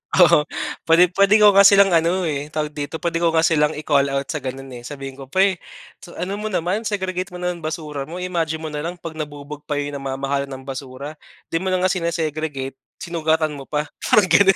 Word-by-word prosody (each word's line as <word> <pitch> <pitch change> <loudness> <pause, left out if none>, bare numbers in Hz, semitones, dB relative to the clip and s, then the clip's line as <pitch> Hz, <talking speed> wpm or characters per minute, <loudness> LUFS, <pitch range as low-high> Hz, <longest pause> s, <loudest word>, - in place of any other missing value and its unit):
Oo 170 -4 +6 0.4
pwede, 170 +2 +6
pwede 200 +2 +6
ko 210 -1 +7
nga 200 0 +8
silang 200 -1 +6
ano, 170 +2 +2
eh, 145 -2 -2
tawag 150 0 -3
dito? 145 +2 -5
Puwede 170 0 -1
ko 170 - +2
nga 160 - +4
silang 155 -2 +3
i-call 145 -2 +2
out 140 0 -1
sa - - -2
ganun, 135 0 -6
eh, 125 - -8
sabihin 135 -1 -7
ko, 135 - -9
"Pre, 190 +4 +2 0.4
so 175 - -13
ano 195 +4 -3
mo 215 - -3
naman, 190 +3 -1
segregate 185 -3 -2
mo 180 - -12
naman 180 -1 -2
basura 155 -3 -5
mo, 165 - -8
imagine 170 -3 -2
mo 155 - -4
nalang 160 +4 -4
pag 165 -2 -8
nabubog 145 0 -7
pa 150 - -1
yung 145 0 -2
namamahala 135 +1 -2
ng 130 -1 -8
basura, 135 +2 -7 0.3
'di 165 - +1
mo 190 - -4
na 185 -1 +1
nga 185 - +3
sine-segregate, 155 -6 -3 0.2
sinugatan 160 -2 0
mo 140 -2 -9
pa", 150 0 -1 0.2
parang 205 -4 +3
ganun. 195 -2 +6
160 Hz, 210 wpm, -21 LUFS, 145-180 Hz, 0.4 s, nga